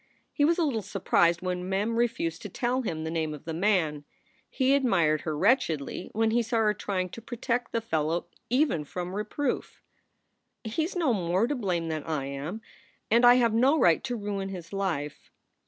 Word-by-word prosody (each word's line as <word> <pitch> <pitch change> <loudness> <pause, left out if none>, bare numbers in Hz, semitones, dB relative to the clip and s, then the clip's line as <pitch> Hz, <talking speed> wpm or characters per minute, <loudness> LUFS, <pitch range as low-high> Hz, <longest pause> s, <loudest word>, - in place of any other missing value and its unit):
He 290 - +1
was 330 +3 +4
a 345 - +2
little 260 -8 0
surprised 175 -3 +1
when 180 0 -3
Mem 205 +4 0
refused 230 -9 -1
to 210 - -6
tell 250 +6 -1
him 160 -9 -3
the 160 - -3
name 160 -2 -2
of 150 - -14
the 165 - -4
man. 165 -5 +1 0.5
He 260 +1 +2
admired 175 - +2
her 155 -2 -3
wretchedly 175 - +1
when 225 +1 +1
he 240 +1 +3
saw 230 +1 -1
her 215 -2 +3
trying 185 -3 -2
to 230 - -9
protect 240 +1 -2
the 230 - -1
fellow 165 -5 -1 0.2
even 250 - +2
from 180 +4 -5
reproof. 215 +7 -3 0.4
" - - -50
He 230 +8 -1
s 360 - -6
no 320 -8 +2
more 185 +1 +1
to 275 - -1
blame 185 -10 -1
than 155 -2 -3
I 155 -4 -2
am, 140 +10 -5 0.5
and 235 +2 +5
I 245 0 +9
have 235 -3 +3
no 260 +7 +4
right 170 - +4
to 245 -2 -2
ruin 200 -3 -3
his 180 -1 -8
life." 165 -7 -3
200 Hz, 195 wpm, -28 LUFS, 165-240 Hz, 0.5 s, I